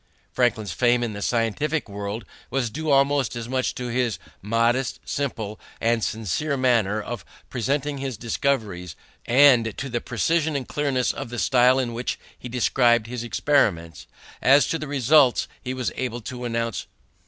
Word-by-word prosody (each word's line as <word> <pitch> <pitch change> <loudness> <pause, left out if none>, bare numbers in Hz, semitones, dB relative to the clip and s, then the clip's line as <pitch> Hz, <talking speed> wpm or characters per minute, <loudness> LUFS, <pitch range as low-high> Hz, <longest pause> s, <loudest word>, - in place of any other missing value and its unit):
Franklin's 110 -6 +1
fame 120 +6 +2
in 115 -3 -2
the 100 - -6
scientific 125 +8 0
world 100 +1 -5 0.2
was 125 -3 -1
due 155 +5 -4
almost 140 -2 +3
as 115 -1 -5
much 130 +1 -1
to 125 - -5
his 120 -5 0 0.2
modest, 115 +5 +1
simple, 110 -7 -3 0.2
and 115 -1 +1
sincere 115 - -1
manner 115 -5 +2
of 115 -1 -6 0.3
presenting 140 +4 -1
his 135 -4 -4
discoveries 110 - -2 0.3
and 120 -4 +5
to 135 - -4
the 120 -1 -2
precision 160 - 0
and 135 -3 -3
clearness 140 -4 0
of - - -6
the 120 - -6
style 125 +1 +4
in 125 -3 -1
which 120 +2 -3 0.2
he 125 - -9
described 120 -1 +3
his 120 0 -5
experiments, 105 - 0 0.3
as 135 +1 +6
to 165 - -2
the 155 - -5
results 140 -1 +4
he 125 - -4
was 130 -2 -2
able 120 -2 -3
to 125 +1 -6
announce. 115 -1 -2
120 Hz, 160 wpm, -24 LUFS, 115-135 Hz, 0.3 s, as